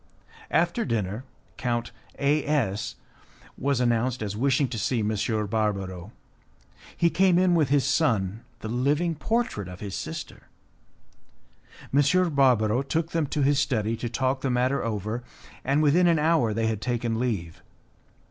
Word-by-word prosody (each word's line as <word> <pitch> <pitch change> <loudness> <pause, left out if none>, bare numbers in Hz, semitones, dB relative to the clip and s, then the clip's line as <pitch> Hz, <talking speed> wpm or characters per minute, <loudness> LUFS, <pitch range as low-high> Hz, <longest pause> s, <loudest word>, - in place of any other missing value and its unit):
After 175 +8 +1
dinner 110 - -2 0.3
Count 120 -1 -2 0.3
A 145 +1 +2
S 110 -9 -1 0.6
was 140 -1 0
announced 120 0 +1
as 105 -1 -4
wishing 135 +4 +2
to 115 -2 -4
see 110 +3 0
M. 110 +1 0 0.3
Barbaro. 100 -3 -2 0.9
He 170 -1 +3
came 185 -2 +4
in 185 -1 +4
with 155 -6 +2
his 140 -1 +3
son, 115 - +1 0.2
the - - -5
living 145 +9 +1
portrait 190 - -1
of 90 0 -9
his 100 -2 -6
sister. - - -6 1.5
M. 150 +5 +3
Barbaro 125 -4 +3
took 160 +4 -2
them 165 -3 0
to 145 +1 -1
his 140 +1 +3
study 115 -5 0
to 120 - -4
talk 130 +2 -1
the 135 - -1
matter 125 +2 +1
over, 110 +2 -3 0.4
and 140 +4 +2
within 170 +5 +4
an 170 -1 +4
hour 155 -7 +2
they 110 +1 -1
had 110 -2 -1
taken 120 -1 -1
leave. 100 -10 -3
125 Hz, 145 wpm, -26 LUFS, 110-145 Hz, 1.5 s, came